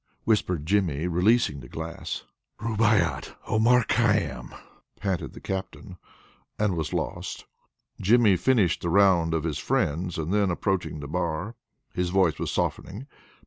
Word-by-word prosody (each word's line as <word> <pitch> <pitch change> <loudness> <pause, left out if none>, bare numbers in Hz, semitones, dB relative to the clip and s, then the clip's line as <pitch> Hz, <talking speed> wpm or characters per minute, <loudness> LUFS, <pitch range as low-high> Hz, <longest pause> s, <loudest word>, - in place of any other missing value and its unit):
whispered 90 -8 0
Jimmy, 85 -5 +1
releasing 90 -2 +2
the - - -11
glass. 80 +1 -5 0.4
"Rubaiyat, 110 -6 +1
Omar 115 +3 +4
Khayyam," - - 0 0.5
panted 95 -5 -2
the - - -10
Captain, 95 0 -6 0.6
and 105 -4 +1
was 80 -2 -3
lost. - - -4 0.6
Jimmy 110 -1 +5
finished 95 -1 +2
the 85 - -2
round 85 -3 +4
of 80 - -1
his 80 -3 -2
friends, 85 +4 -1
and 80 +3 -2
then 105 -2 +2
approached 85 -4 -1
the 70 - -6
bar. 85 +5 -2 0.4
His 90 0 -1
voice 90 -5 +2
was - - -2
softening. 110 +7 -3
90 Hz, 135 wpm, -26 LUFS, 80-105 Hz, 0.6 s, Jimmy